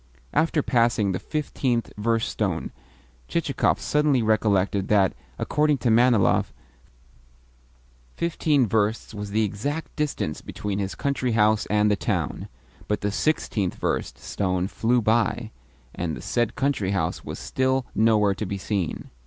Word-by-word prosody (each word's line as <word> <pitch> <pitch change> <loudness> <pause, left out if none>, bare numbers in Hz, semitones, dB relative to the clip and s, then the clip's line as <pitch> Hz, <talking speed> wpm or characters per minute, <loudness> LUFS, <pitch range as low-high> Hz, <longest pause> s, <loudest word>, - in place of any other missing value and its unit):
After 155 0 +2
passing 115 -5 +2
the 90 - -2
fifteenth 130 -6 -2
verst 115 +2 0
stone - - -2 0.6
Chichikov - - +1
suddenly 150 -5 +2
recollected 100 -3 +2
that, 100 -3 +3 0.2
according 150 0 +1
to 120 -2 +1
Manilov, 120 -2 +4 1.6
fifteen 155 -5 +1
versts 110 +1 0
was 105 -1 -5
the 110 +2 +1
exact 140 +10 -3
distance 145 - -2
between 105 -1 -4
his 95 -1 -3
country 135 -4 -1
house 110 -1 +3
and 105 0 +3
the - - +3
town; - - -2 0.4
but 105 - -1
the 105 -1 0
sixteenth 105 - 0
verst - - -2
stone 95 -2 -1
flew 120 +3 +1
by, 110 0 +1 0.4
and 85 -3 -3
the - - -8
said 120 -2 0
country 130 -8 0
house 80 -4 -1
was - - -6
still 130 0 0
nowhere 105 -2 +3
to 105 - -4
be 100 - -3
seen. 95 -3 -3
110 Hz, 135 wpm, -25 LUFS, 100-130 Hz, 1.6 s, Manilov